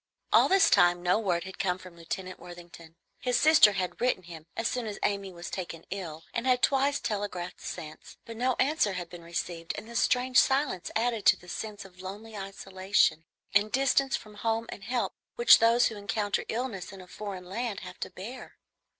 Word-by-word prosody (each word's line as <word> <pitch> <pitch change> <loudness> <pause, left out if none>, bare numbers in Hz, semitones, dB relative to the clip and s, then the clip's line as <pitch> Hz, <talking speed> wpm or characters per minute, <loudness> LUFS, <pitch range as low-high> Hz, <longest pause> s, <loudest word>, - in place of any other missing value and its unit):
All - - +6
this 380 -3 +5
time 175 0 +5
no 180 +4 +3
word 180 -6 0
had 190 0 -10
come 180 -2 +1
from 185 -2 -13
Lieutenant 185 +2 -6
Worthington. 170 -2 -12 0.2
His 250 -1 +1
sister 305 -9 +7
had 185 +1 -3
written 245 -7 +1
him 165 -2 -11
as 230 - +1
soon 245 -3 -2
as 205 - -5
Amy 200 -1 -1
was 170 -1 -8
taken 170 -3 -6
ill, 165 -5 -5
and 235 +2 -2
had 250 -1 +3
twice 280 +1 +3
telegraphed 200 -4 -4
since, 155 -3 -8
but 230 - -8
no 250 +2 +1
answer 260 -7 +2
had 175 -2 -5
been 175 -1 -9
received, 170 0 -4
and - - -7
this 235 0 -2
strange 250 0 +3
silence 265 -9 +1
added 230 -1 0
to - - +7
the 180 - -17
sense 205 +2 -6
of 185 -1 -14
lonely 210 +4 -8
isolation 195 -4 0 0.3
and 205 +2 +3
distance 270 0 +2
from 215 - -8
home 225 +2 -1
and 195 - -8
help 245 +1 -1 0.2
which 475 +1 +8
those 230 +1 +5
who 220 - -8
encounter 205 0 -1
illness 225 -6 -3
in 195 - -11
a 185 - -11
foreign 190 -1 -7
land 215 +3 -3
have 180 -1 -10
to - - -4
bear. 215 +8 -9
200 Hz, 195 wpm, -29 LUFS, 180-235 Hz, 0.3 s, which